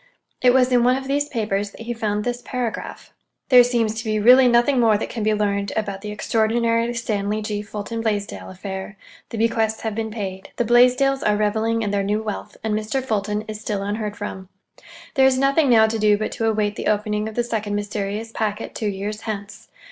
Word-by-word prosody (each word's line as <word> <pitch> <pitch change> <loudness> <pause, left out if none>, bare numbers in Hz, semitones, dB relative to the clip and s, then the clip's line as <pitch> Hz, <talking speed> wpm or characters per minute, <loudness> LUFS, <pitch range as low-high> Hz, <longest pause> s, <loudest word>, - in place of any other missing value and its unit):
It 250 - +6
was 255 0 +3
in 245 -1 +4
one 250 +1 +4
of 265 0 -5
these 285 +1 0
papers 205 -4 -1
that 200 - -14
he 235 +1 -4
found 210 -2 -2
this 245 +1 -3
paragraph:— 245 -3 -5 0.4
There 250 -2 +8
seems 235 -3 0
to - - -5
be 215 -2 0
really 250 +4 +7
nothing 240 +3 +3
more 225 -3 +4
that - - -5
can 230 - -4
be 215 0 +2
learned 200 -1 -1
about 200 -3 -3
the 210 - -6
extraordinary 230 +2 +1
Stanley 215 -2 -2
G. 210 -1 -3
Fulton 210 +2 -5
Blaisdell 210 -2 -3
affair. 190 +1 -7 0.3
The 230 - -6
bequests 225 -1 +1
have 220 -1 -2
been 220 +1 -3
paid, 195 -3 -6
the 240 - 0
Blaisdells 250 +3 +4
are 210 0 +2
reveling 220 +2 0
in 205 - -1
their 200 -1 +1
new 210 +2 -1
wealth, 210 -1 -6
and 220 -1 -1
Mr. 215 +5 -1
Fulton 210 -3 -1
is 215 0 -7
still 205 -3 -2
unheard 210 +1 -3
from. 190 -3 -6 0.6
There 265 -1 +5
is 260 -1 +2
nothing 275 +2 +3
now 225 -2 +6
to 220 0 -1
do 210 -1 +4
but 215 - -3
to 225 - -1
await 210 -1 0
the - - -3
opening 210 0 0
of 220 - -11
the 240 - +1
second 215 -3 -2
mysterious 205 +1 -3
packet 215 -2 -3
two 215 - -2
years 205 +2 -4
hence. 210 -2 -6
220 Hz, 210 wpm, -22 LUFS, 210-235 Hz, 0.6 s, There